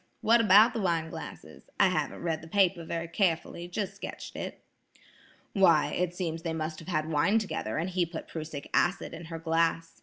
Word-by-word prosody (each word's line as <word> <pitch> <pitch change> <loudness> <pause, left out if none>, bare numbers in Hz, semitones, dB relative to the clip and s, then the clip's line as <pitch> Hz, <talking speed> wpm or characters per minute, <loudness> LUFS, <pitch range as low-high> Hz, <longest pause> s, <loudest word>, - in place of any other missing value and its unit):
What 230 +1 +5
about 215 +2 +7
the 225 - -2
wine 165 -3 0
glasses? - - -10
I - - +6
haven't - - -2
read 160 -2 -1
the 165 - -11
paper 185 -1 +2
very 165 +1 -4
carefully; 170 -1 -1
just 190 +3 -3
sketched - - -8
it." - - -6 0.9
"Why, 170 -7 +4
it 175 0 -1
seems 165 -3 -3
they 165 -1 -3
must 155 -1 -3
have 165 - -12
had 155 -4 -1
wine 165 +8 +3
together 190 - -2
and 165 +3 -1
he 180 -2 0
put 165 -1 -7
prussic 155 -3 -6
acid 185 +3 +1
in 165 +1 -8
her 165 0 -6
glass. 165 0 0
165 Hz, 190 wpm, -29 LUFS, 160-185 Hz, 0.9 s, about